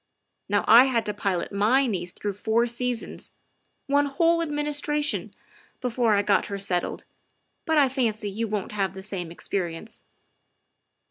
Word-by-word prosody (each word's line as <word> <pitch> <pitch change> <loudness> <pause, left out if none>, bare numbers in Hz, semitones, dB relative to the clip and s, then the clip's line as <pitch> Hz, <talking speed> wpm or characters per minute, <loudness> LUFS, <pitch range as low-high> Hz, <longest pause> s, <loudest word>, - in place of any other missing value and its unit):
Now 205 0 +1
I 235 +4 +9
had 235 -4 0
to 210 - -2
pilot 190 -4 -2
my 220 +7 +3
niece 180 -7 -3
through 205 +2 -4
four 220 +4 +1
seasons 240 0 -4 0.5
one 285 +1 +2
whole 335 +4 +2
administration 295 -1 -1 0.5
before 240 -3 +1
I 200 - +2
got 205 0 +2
her 200 - -4
settled, 185 -3 -2 0.6
but 320 -2 +1
I 285 -2 +6
fancy 230 -5 -1
you 225 +3 -2
won't 210 -2 -3
have 195 -3 -2
the 190 - -7
same 180 -5 -5
ex 170 - -7
perience. 175 +1 -4
225 Hz, 150 wpm, -25 LUFS, 200-270 Hz, 0.6 s, I